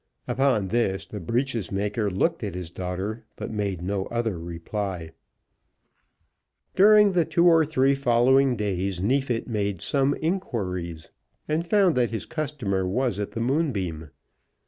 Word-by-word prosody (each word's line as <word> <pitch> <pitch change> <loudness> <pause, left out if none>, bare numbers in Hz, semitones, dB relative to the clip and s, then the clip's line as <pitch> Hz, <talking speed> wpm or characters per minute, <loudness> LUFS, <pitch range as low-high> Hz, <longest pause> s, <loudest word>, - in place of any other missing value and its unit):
Upon 130 -8 +1
this 105 -4 0
the 105 - -7
breeches 115 +1 -2
maker 105 +2 -1
looked 145 - 0
at 100 -4 -4
his 90 -2 -6
daughter, 95 +6 -4
but - - -6
made 100 -5 -2
no 95 +1 -2
other 115 -6 -2
reply. 85 +1 -5 1.6
During 210 +1 +7
the 180 -2 +3
two 170 +2 +1
or 165 -2 +6
three 140 -3 +2
following 130 0 +3
days 100 -3 -2
Neefit 125 +3 0
made 100 -5 -2
some 140 - +1
inquiries, 90 - -3 0.4
and 160 +3 -1
found 195 -4 +4
that 120 -2 +2
his 115 - -4
customer 140 -12 -2
was 120 +1 0
at 105 - -4
the 115 - -3
Moonbeam. 105 - -1
115 Hz, 140 wpm, -25 LUFS, 95-140 Hz, 1.6 s, During